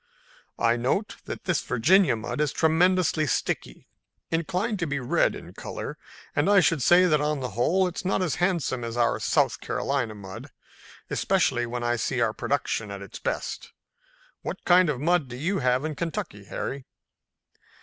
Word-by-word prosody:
I 115 0 +2
note 135 - -1
that - - -6
this 180 -2 0
Virginia 160 - +3
mud 110 +6 -4
is 150 - +1
tremendously 165 -1 +2
sticky, - - -2 0.4
inclined 185 +6 -1
to 170 - -1
be 140 0 -1
red 125 - +1
in - - -10
color, - - -6 0.4
and 145 +6 +2
I 205 -1 +7
should 165 -4 +2
say 175 +8 +6
that 155 -4 +3
on 150 -1 0
the 125 -2 -3
whole 165 - +2
it's 180 0 -5
not 190 0 +1
as 165 -6 -1
handsome 170 -9 0
as 115 0 -4
our 120 - +2
South - - +1
Carolina 125 -6 -2
mud, 95 -2 -9 0.6
especially 135 -11 +1
when 120 0 -4
I 120 0 +1
see 125 +3 -1
our 115 -2 +2
product 140 -2 -1
at 100 -2 -7
its 100 - -10
best. - - -4 0.7
What - - -6
kind 180 -1 +5
of 135 -5 -1
mud 165 0 +2
do 120 - -8
you 170 +10 -1
have 130 +1 +1
in 155 - -2
Kentucky, 145 - -4
Harry?" 135 +6 -5
145 Hz, 170 wpm, -26 LUFS, 120-180 Hz, 0.7 s, I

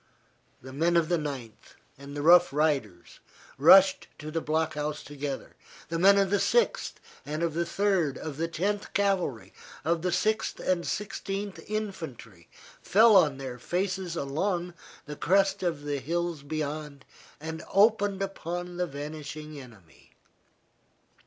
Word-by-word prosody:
The 130 0 -10
men 170 +4 +2
of 165 -1 +2
the 175 -2 +2
Ninth 135 -7 -7 0.2
and 140 +1 -10
the 145 - -3
Rough 175 -1 +7
Riders 135 - -1 0.4
rushed 190 +6 +7
to 155 0 -7
the 165 +1 -1
block 160 +1 0
house 150 0 -3
together, 145 -1 -6 0.3
the 165 0 -2
men 195 +3 +6
of 195 -1 +2
the 205 - +3
Sixth, 480 - +1 0.3
of 155 +2 -1
the 170 +1 -1
Third, 185 -6 +1
of 150 -3 -6
the 165 +1 -1
Tenth 200 +5 -2
Cavalry, 190 - 0 0.3
of 165 0 +1
the 180 +1 0
Sixth 220 +4 0
and 180 -2 0
Sixteenth 200 -1 -4
Infantry, 160 - -6 0.3
fell 220 +2 +5
on 150 -8 +5
their 130 -2 -7
faces 185 +3 -2
along 175 +5 -2 0.3
the 150 - -7
crest 195 +4 +2
of 165 -5 -2
the 145 -1 -2
hills 170 +2 -2
beyond, 150 -1 -5 0.3
and 160 +1 -6
opened 205 -1 +3
upon 175 -2 -5
the 180 0 0
vanishing 150 +1 -7
enemy. 105 -10 -18
165 Hz, 140 wpm, -28 LUFS, 145-190 Hz, 0.4 s, Rough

